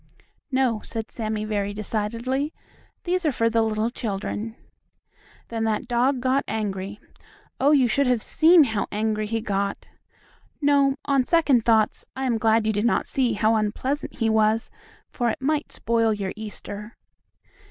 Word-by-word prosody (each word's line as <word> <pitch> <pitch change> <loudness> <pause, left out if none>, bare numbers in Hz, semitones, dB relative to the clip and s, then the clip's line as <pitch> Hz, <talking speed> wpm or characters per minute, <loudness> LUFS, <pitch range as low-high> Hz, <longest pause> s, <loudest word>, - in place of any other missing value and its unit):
"No," 255 -5 +1
said 225 -1 -6
Sammie, 215 -2 -3
very 205 -1 -2
decidedly, 230 +7 -2 0.5
"these 365 +1 0
are 310 - +2
for 230 -2 +1
the 225 0 +3
little 220 +1 0
children." 220 0 -4 0.9
Then 225 -1 -2
that 220 +1 -1
dog 250 +2 +2
got 260 +2 +2
angry. 205 -2 -3 0.6
Oh, 275 - +4
you 275 -4 +5
should 275 +4 +1
have 245 -3 +1
seen 325 +1 +6
how 220 -6 -1
angry 215 0 -1
he 225 +1 -2
got. 200 -2 -2 0.7
No, 280 -2 +3
on 275 -2 +3
second 280 -6 +3
thoughts 220 -2 +2
I 265 0 -3
am 235 -3 +1
glad 220 0 +3
you 220 - +1
did 205 0 0
not 235 - +2
see 250 -4 0
how 215 +2 +2
unpleasant 225 +7 -2
he 225 - 0
was, 220 +1 +2 0.4
for 240 -1 -1
it - - -3
might 295 +2 -1
spoil 230 -1 +1
your 195 -2 -4
Easter. 210 0 -8
225 Hz, 155 wpm, -24 LUFS, 215-260 Hz, 0.9 s, seen